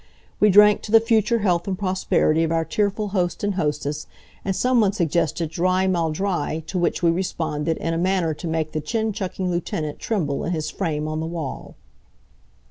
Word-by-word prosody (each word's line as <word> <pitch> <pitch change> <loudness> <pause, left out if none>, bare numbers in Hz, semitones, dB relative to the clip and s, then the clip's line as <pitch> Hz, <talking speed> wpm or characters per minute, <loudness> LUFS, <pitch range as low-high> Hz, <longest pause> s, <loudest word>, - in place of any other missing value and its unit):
We 210 - +5
drank 210 +1 +6
to 210 - -7
the 225 - +8
future 225 0 +2
health 175 -1 +1
and 190 -1 -2
prosperity 185 -4 +1
of 165 - -1
our 165 0 +1
tearful 205 +4 -1
host 180 -2 -1
and 205 0 +1
hostess, 150 -3 -2 0.4
and 195 -1 -1
some 250 +1 +3
one 200 -2 +2
suggested 165 -3 0
drei 185 +3 +1
mal 175 -4 +1
drei, 160 -3 -2
to 185 - -3
which 175 +1 0
we 170 - +5
responded 165 -3 -2
in 165 - -2
a 165 - -1
manner 180 -3 +1
to 160 - -7
make 160 -1 -1
the 155 - -2
chin 220 +6 -1
chucking 190 -2 -3
lieutenant 160 -3 -3
tremble 160 -11 -1
in 175 - -1
his 155 -2 -3
frame 150 -2 -2
on 155 0 -3
the 160 - -3
wall. 165 -5 -6
175 Hz, 195 wpm, -23 LUFS, 160-195 Hz, 0.4 s, the